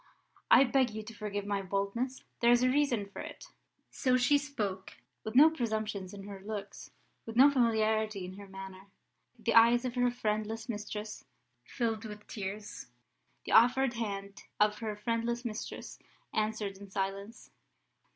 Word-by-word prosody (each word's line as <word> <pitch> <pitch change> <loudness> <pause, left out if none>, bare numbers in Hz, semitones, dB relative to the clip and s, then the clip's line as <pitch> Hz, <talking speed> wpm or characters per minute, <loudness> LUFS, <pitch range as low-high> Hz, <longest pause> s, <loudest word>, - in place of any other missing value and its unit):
I - - +8
beg 260 -1 +2
you 220 - -4
to 225 - -10
forgive 205 -1 -4
my 200 -1 -1
boldness; 200 +7 -2 0.2
there 235 0 +5
is 240 +1 +5
a 255 - +4
reason 260 -7 +1
for 200 - -11
it." - - -9 0.5
So 255 -1 +2
she 270 +3 +4
spoke, 210 -10 -4 0.3
with 220 +2 -5
no 305 +5 +8
presumption 220 -8 -2
in 200 -1 -9
her 200 -1 -8
looks, 205 +1 -7 0.4
with 225 - -6
no 275 +4 +8
familiarity 220 -5 +1
in 185 - -8
her 200 - -10
manner. 195 0 -10 0.5
The 230 0 -1
eyes 235 +2 +6
of 250 - -2
her 245 0 +2
friendless 220 -1 -2
mistress 210 -1 -5 0.4
filled 225 - -2
with 210 -1 -9
tears, 205 +1 -6 0.6
the - - -5
offered 250 +2 +5
hand 200 -4 -5 0.2
of 210 0 +3
her 215 -2 -3
friendless 230 +3 -2
mistress 220 -1 -6 0.3
answered 215 -2 -1
in 200 0 -11
silence. 195 +3 -4
220 Hz, 155 wpm, -31 LUFS, 200-240 Hz, 0.6 s, I